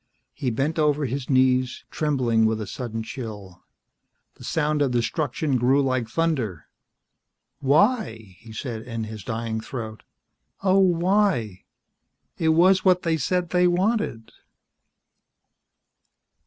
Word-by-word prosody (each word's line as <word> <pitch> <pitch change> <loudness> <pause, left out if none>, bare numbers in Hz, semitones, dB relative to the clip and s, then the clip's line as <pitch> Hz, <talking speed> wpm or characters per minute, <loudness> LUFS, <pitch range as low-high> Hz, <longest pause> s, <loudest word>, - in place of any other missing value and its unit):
He 135 -5 -2
bent 140 +8 -1
over 150 -1 +2
his 130 +1 -4
knees, 130 -1 +2
trembling 125 -7 +1
with 110 0 -1
a 110 - -4
sudden 115 +1 -5
chill. 105 -6 -8 0.7
The - - -15
sound 150 -2 0
of 140 - +3
destruction 130 +3 -1
grew 130 +3 +3
like 130 -4 0
thunder. 125 - -1 0.9
"Why?" 140 - +1
he 115 - -13
said 115 0 -5
in 115 -1 -5
his 110 -2 -7
dying 110 +1 -3
throat. 110 -4 -7 0.6
"Oh, 190 0 +4
why? 180 - +1 0.7
It 160 - +2
was 185 +4 +4
what 185 -1 +3
they 165 -1 +1
said 175 +4 -1
they 180 0 +4
wanted." 180 - 0
130 Hz, 120 wpm, -24 LUFS, 115-165 Hz, 0.9 s, Oh